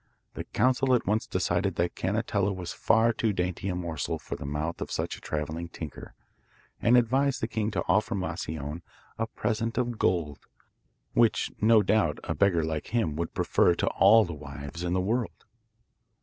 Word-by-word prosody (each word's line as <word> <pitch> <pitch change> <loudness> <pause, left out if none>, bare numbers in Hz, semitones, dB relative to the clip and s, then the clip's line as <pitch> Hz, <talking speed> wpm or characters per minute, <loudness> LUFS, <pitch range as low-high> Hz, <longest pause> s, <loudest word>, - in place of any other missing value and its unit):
The - - -6
council 130 +2 +2
at 120 - 0
once 105 +3 0
decided 90 +1 0
that 85 0 0
Canetella 100 0 0
was 90 -2 -6
far 115 +1 +3
too 110 -1 0
dainty 90 +1 -2
a 90 - -1
morsel 85 -4 -3
for - - -6
the 70 - -7
mouth 75 +3 -3
of - - -4
such - - -2
a - - -14
travelling 80 +3 -4
tinker, 80 -3 -8 0.7
and 120 +2 +5
advised 130 +3 +2
the 115 - -1
king 110 -2 -1
to 105 - -2
offer 105 +4 +2
Moscione 80 -4 -4 0.4
a 115 - 0
present 115 +1 -2
of 120 -3 -1
gold, 85 -6 0 0.7
which 115 -2 +2
no 110 0 +6
doubt 95 -6 +2
a - - -2
beggar 95 -5 +2
like 80 -1 -3
him 110 -11 0
would 85 +1 -4
prefer 85 - +3
to - - -1
all 105 +3 +6
the 85 - -6
wives 75 +2 -8
in 90 0 -1
the 95 - +2
world. 115 +5 -2
95 Hz, 180 wpm, -28 LUFS, 85-115 Hz, 0.7 s, no